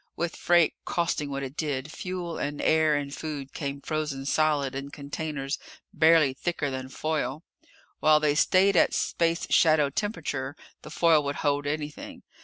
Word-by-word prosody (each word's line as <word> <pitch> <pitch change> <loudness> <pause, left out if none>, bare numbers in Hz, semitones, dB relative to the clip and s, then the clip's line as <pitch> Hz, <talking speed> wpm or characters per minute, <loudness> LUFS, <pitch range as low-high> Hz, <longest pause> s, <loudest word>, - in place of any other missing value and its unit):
With 170 0 -3
freight 175 -2 +3
costing 165 -4 -1
what 140 0 -3
it 135 +1 -6
did, 145 -2 -3
fuel 180 -2 -5
and 145 +1 -3
air 155 -1 +3
and 140 -1 -3
food 145 -4 -6
came 140 -2 -4
frozen 150 -4 -3
solid, 145 -2 +1
in 140 +1 -5
containers 145 -1 -4 0.3
barely 160 -4 +5
thicker 145 0 -2
than 130 0 -5
foil. 155 0 -2 0.6
While 155 0 +5
they 150 -1 +2
stayed 185 +5 +4
at 165 - +4
space 170 0 0
shadow 155 -3 +4
temperature, 145 -7 -3 0.3
the - - -10
foil 165 -3 +3
would 140 0 -2
hold 145 0 +1
anything. 150 0 -5
150 Hz, 155 wpm, -27 LUFS, 140-160 Hz, 0.6 s, barely